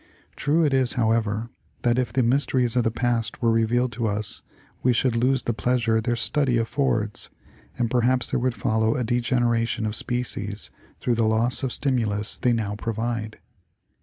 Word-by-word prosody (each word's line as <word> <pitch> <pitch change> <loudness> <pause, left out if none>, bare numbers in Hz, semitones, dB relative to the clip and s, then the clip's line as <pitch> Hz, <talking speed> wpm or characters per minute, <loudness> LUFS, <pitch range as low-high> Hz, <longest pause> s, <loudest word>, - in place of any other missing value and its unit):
True 160 +3 +1
it 145 - +1
is, 130 -2 +2
however, 110 -1 0 0.3
that 120 0 +2
if 125 - -1
the 130 - +1
mysteries 125 -1 +1
of 125 - +3
the 115 - +2
past 115 0 -1
were 115 -2 +2
revealed 120 +2 +1
to 120 -2 -2
us 105 0 -3 0.4
we 125 - +3
should 120 +1 +1
lose 130 +2 +2
the 120 - -1
pleasures 115 -1 +1
their 120 +2 0
study 125 +2 +1
affords 115 -3 -1 0.5
and 120 - +1
perhaps 125 +1 +1
there - - +1
would 125 -1 0
follow 110 +2 +1
a 125 - -1
degeneration 120 -1 0
of 105 0 0
species 110 -5 -1 0.3
through 125 - 0
the 115 -1 +1
loss 115 +3 +1
of 130 - -2
stimulus 110 -7 0
they 125 - +2
now 110 -3 -1
provide. 115 0 -3
120 Hz, 170 wpm, -24 LUFS, 110-125 Hz, 0.5 s, of